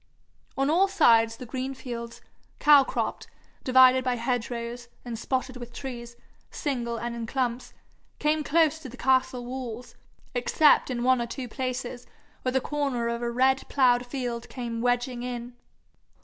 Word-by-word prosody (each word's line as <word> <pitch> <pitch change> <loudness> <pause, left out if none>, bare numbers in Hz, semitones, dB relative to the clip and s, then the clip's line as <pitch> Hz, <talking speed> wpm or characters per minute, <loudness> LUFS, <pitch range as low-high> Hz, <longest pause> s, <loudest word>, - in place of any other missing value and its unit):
On 270 0 +2
all 350 +6 +4
sides 230 -10 +4
the 250 - -8
green 260 +2 -4
fields, 235 -2 -7 0.4
cow 295 -2 +7
cropped, - - -3 0.4
divided 255 0 +6
by 250 -1 0
hedge 240 0 -1
rows, 240 0 -5 0.2
and 240 - -5
spotted 255 0 -2
with 240 -1 -9
trees, 240 -2 -7 0.3
single 240 -6 -3
and 235 +1 -4
in 230 -1 -5
clumps, 250 -1 -2 0.5
came 300 +1 +1
close 320 0 +2
to 285 -5 -9
the 250 - -12
castle 260 -1 +1
walls, 245 -2 -6 0.4
except 270 +5 +4
in 240 -2 -2
one 255 -1 +3
or 235 - -2
two 255 +1 -6
places 250 0 -4 0.3
where 255 - -1
the 265 - +2
corner 275 -4 -2
of 235 0 -3
a 240 - -1
red 260 +2 +2
ploughed 250 -3 +3
field 245 -3 -4
came 235 -2 -4
wedging 245 0 0
in. 245 -1 -5
250 Hz, 160 wpm, -27 LUFS, 240-265 Hz, 0.5 s, cow